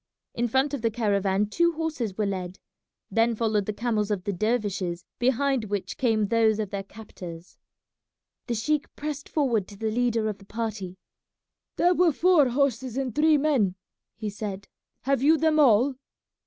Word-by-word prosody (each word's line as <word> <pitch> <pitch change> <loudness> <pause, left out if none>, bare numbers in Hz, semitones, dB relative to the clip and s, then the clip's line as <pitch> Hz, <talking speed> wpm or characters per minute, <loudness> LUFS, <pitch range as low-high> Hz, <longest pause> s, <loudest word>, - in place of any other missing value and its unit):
In 240 +1 0
front 265 +4 +1
of 280 - -2
the 230 - +2
caravan 200 -3 +1
two 340 +11 +1
horses 310 - -3
were 215 - +1
led; 185 -2 -4 0.5
then 230 +1 +2
followed 215 -3 0
the - - 0
camels 215 -1 -1
of 200 -4 -1
the 200 - -2
dervishes, 195 -4 -1
behind 260 0 +1
which 200 -3 -3
came 225 -5 +1
those 220 0 +3
of 215 -3 -3
their 200 - -3
captors. 185 -4 -11 0.9
The 240 - -1
sheik 295 +7 -1
pressed 295 -1 -5
forward 240 - +1
to 200 - -12
the 220 +1 -2
leader 230 -1 +1
of 210 -2 -4
the 195 - -16
party. 210 -4 -4 0.8
"There 355 +1 +4
were 355 -1 +4
four 320 -3 +4
horses 260 -2 0
and 265 -4 -2
three 310 +2 +4
men," 270 -11 +1 0.4
he 215 -2 -4
said; 200 -1 -6 0.3
"have 275 -1 +1
you 310 +4 +5
them 310 0 +2
all?" 260 0 +5
225 Hz, 170 wpm, -26 LUFS, 205-275 Hz, 0.9 s, you